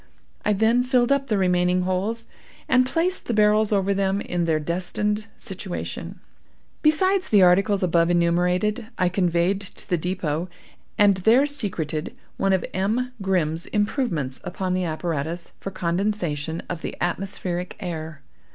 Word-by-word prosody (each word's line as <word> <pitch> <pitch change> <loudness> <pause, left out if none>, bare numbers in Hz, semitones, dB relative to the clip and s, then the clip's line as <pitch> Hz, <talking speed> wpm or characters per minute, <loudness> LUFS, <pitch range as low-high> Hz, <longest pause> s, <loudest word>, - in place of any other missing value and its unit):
I 210 - +2
then 225 +4 +3
filled 250 0 +2
up 280 -1 +2
the 215 - +1
remaining 180 -1 +2
holes, 200 +5 -1 0.4
and 255 0 +4
placed 345 +6 0
the 235 - 0
barrels 215 0 +4
over 200 -1 +2
them 195 0 0
in 175 -3 -2
their 160 -2 +1
destined 205 +6 -2
situation. 190 -3 -6 0.6
"Besides 375 +5 +3
the 205 -3 +6
articles 195 +2 +4
above 170 -1 +3
enumerated, 180 +6 +1
I 180 - +2
conveyed 180 +1 +1
to 200 - -8
the 175 - 0
depot, 175 -1 -2 0.5
and 200 -2 +5
there 225 +9 +4
secreted, 180 - -1 0.2
one 195 - +1
of 190 -1 +1
M. 225 +7 0
Grimm's 170 -4 0
improvements 205 - -1
upon 185 +1 -3
the 185 0 0
apparatus 165 0 -3
for - - -5
condensation 170 -4 -2
of 175 -3 -5
the - - -5
atmospheric 180 0 -2
air. 160 -5 -6
185 Hz, 140 wpm, -24 LUFS, 175-210 Hz, 0.6 s, the